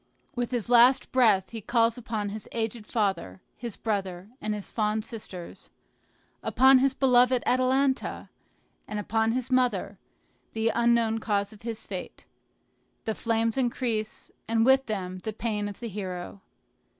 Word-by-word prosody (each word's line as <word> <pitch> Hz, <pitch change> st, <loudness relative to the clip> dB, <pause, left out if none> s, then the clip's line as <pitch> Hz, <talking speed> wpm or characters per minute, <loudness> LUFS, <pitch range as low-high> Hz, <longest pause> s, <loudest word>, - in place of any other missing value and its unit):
With 245 Hz, -1 st, -1 dB
his 240 Hz, -3 st, -2 dB
last 245 Hz, +2 st, +5 dB
breath 220 Hz, -7 st, +3 dB
he 225 Hz, -1 st, -6 dB
calls 230 Hz, +1 st, +2 dB
upon 220 Hz, -4 st, -3 dB
his 210 Hz, 0 st, -7 dB
aged 225 Hz, -1 st, -3 dB
father, 190 Hz, -, -1 dB, 0.2 s
his 235 Hz, -4 st, -6 dB
brother, 195 Hz, -3 st, -3 dB
and 215 Hz, 0 st, -1 dB
his 205 Hz, -, -8 dB
fond 215 Hz, 0 st, 0 dB
sisters, 200 Hz, -7 st, -8 dB, 0.7 s
upon 265 Hz, 0 st, +5 dB
his 270 Hz, 0 st, +2 dB
beloved 250 Hz, -2 st, +4 dB
Atalanta, 260 Hz, +2 st, +1 dB, 0.6 s
and 210 Hz, -, -4 dB
upon 220 Hz, +2 st, 0 dB
his 255 Hz, +1 st, -3 dB
mother, 240 Hz, -6 st, +1 dB, 0.5 s
the 225 Hz, 0 st, +1 dB
unknown 235 Hz, -1 st, +2 dB
cause 205 Hz, -2 st, -1 dB
of 210 Hz, -, -16 dB
his 230 Hz, -1 st, -5 dB
fate. -, -, -7 dB, 0.8 s
The 220 Hz, -, 0 dB
flames 230 Hz, +1 st, 0 dB
increase, 235 Hz, -4 st, -2 dB, 0.2 s
and 225 Hz, 0 st, +2 dB
with 265 Hz, 0 st, +4 dB
them 185 Hz, -4 st, -4 dB
the 215 Hz, +4 st, -5 dB
pain 210 Hz, -2 st, -2 dB
of 200 Hz, -, -10 dB
the 235 Hz, -, -5 dB
hero. 190 Hz, -2 st, -6 dB
225 Hz, 145 wpm, -27 LUFS, 210-245 Hz, 0.8 s, last